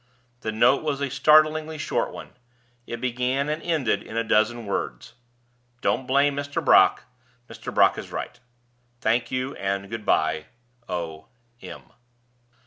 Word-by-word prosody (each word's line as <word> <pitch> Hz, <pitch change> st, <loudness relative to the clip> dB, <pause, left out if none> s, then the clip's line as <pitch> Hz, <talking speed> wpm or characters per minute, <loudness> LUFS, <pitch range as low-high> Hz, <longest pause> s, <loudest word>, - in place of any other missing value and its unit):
The 110 Hz, -, -3 dB
note 120 Hz, +5 st, +4 dB
was 150 Hz, -3 st, -2 dB
a 140 Hz, -2 st, -2 dB
startlingly 155 Hz, +1 st, +4 dB
short 150 Hz, -, -1 dB
one; -, -, -10 dB, 0.6 s
it 120 Hz, -, -5 dB
began 130 Hz, +3 st, -1 dB
and 155 Hz, +2 st, -2 dB
ended 135 Hz, -12 st, 0 dB
in 110 Hz, -, -8 dB
a 115 Hz, -, +1 dB
dozen 110 Hz, +2 st, +1 dB
words: 100 Hz, -, -4 dB, 0.7 s
"Don't 130 Hz, 0 st, 0 dB
blame 140 Hz, +1 st, +3 dB
Mr. 140 Hz, 0 st, -3 dB
Brock; -, -, +5 dB, 0.4 s
Mr. -, -, -8 dB
Brock -, -, +4 dB
is -, -, -9 dB
right. 120 Hz, -, -6 dB, 0.6 s
Thank 120 Hz, 0 st, +1 dB
you, 130 Hz, +2 st, -3 dB
and 100 Hz, 0 st, -3 dB
good 115 Hz, -1 st, -5 dB
by. 80 Hz, 0 st, +1 dB, 0.4 s
O. 80 Hz, -3 st, -5 dB, 0.3 s
M." -, -, -9 dB
125 Hz, 140 wpm, -24 LUFS, 110-140 Hz, 0.7 s, Brock